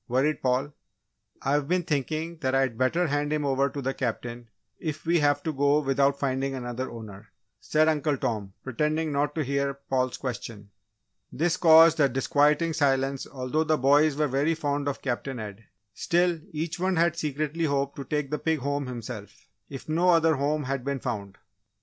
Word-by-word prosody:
worried 135 +5 +1
Paul. 130 +3 0 0.7
"I've 140 +1 +1
been 180 +2 +1
thinking 155 +2 -2
that 130 -4 -1
I'd 135 -3 +1
better 130 +9 +1
hand 145 -1 -1
him 150 -1 0
over 135 0 +1
to 140 +1 -6
the 135 +1 -1
Captain, 120 -1 -4 0.3
if 155 -1 -5
we 170 +1 +3
have 145 -1 +2
to 160 - -2
go 145 +1 +3
without 140 0 +2
finding 135 0 -1
another 125 0 -4
owner," 110 -2 -10 0.3
said 155 +1 +2
Uncle 150 -2 +1
Tom, 105 -6 -3
pretending 150 +4 -1
not 145 +1 0
to 155 - 0
hear 140 0 -1
Paul's 130 -2 -2
question. 115 -5 -6 0.6
This 165 +4 +1
caused 165 -1 +7
a 140 -2 +5
disquieting 150 +5 +2
silence 135 -3 +1
although 135 +4 -1
the 155 -1 +1
boys 145 +3 +4
were 150 +1 +1
very 145 +5 +1
fond 145 -2 -2
of 140 - -3
Captain 130 0 -3
Ed; 105 -1 -8 0.3
still 175 - +1
each 160 +2 -4
one 185 +1 +1
had 170 0 +2
secretly 155 +1 -2
hoped 140 -1 -1
to 140 - -4
take 150 +1 -2
the 150 - -1
pig 160 -1 0
home 140 0 -2
himself, 115 -4 -8 0.2
if 135 -2 -8
no 170 +4 +2
other 165 -2 +5
home 145 +2 0
had 135 -1 -3
been 140 0 -2
found. 100 -7 -5
140 Hz, 180 wpm, -27 LUFS, 130-155 Hz, 0.7 s, caused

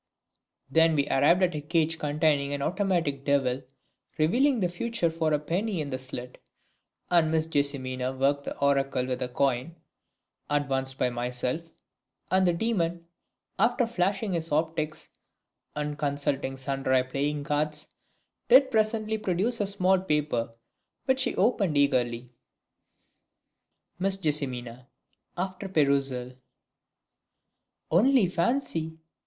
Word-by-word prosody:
Then 160 +2 +4
we 140 -1 +1
arrived 160 +7 +4
at 180 -1 +2
a 150 - -4
cage 165 +1 0
containing 145 -1 +1
an 140 -1 -2
automatic 175 -7 0
Devil 135 -2 +1 0.6
revealing 245 - +3
the 185 - +2
future 175 0 -1
for 160 -1 -1
a 150 - +3
penny 180 +6 -2
in 145 -2 -3
the 130 - -3
slit, 125 -1 -6 0.7
and 170 -3 +4
Miss 160 0 +1
JESSIMINA 130 -4 -1
worked 140 +1 +1
the - - -5
oracle 140 -2 +1
with 130 0 -3
a 125 - -2
coin 135 +4 0 0.7
advanced 135 -2 0
by 125 - +1
myself, 125 +6 -2 0.6
and 185 0 +4
the 175 - +3
demon, 170 -4 -1 0.5
after 245 +1 +3
flashing 200 -1 -1
his 165 -2 -3
optics 155 0 -1 0.7
and 150 0 -3
consulting 140 -2 -1
sundry 130 -1 0
playing 145 +3 -2
cards, 150 +1 -2 0.6
did 260 +2 +7
presently 220 -1 +1
produce 210 +5 -1
a 205 - 0
small 190 -1 +2
paper 150 -9 -1 0.5
which 260 -1 +2
she 260 - +1
opened 200 -7 +2
eagerly. 125 -4 +1 1.7
Miss 195 +1 +1
Jess. 150 -5 0 1.0
(after 190 +2 -4
perusal). 140 -6 +1 1.6
Only 235 +6 +5
fancy! 170 - -1
155 Hz, 120 wpm, -27 LUFS, 140-185 Hz, 1.7 s, did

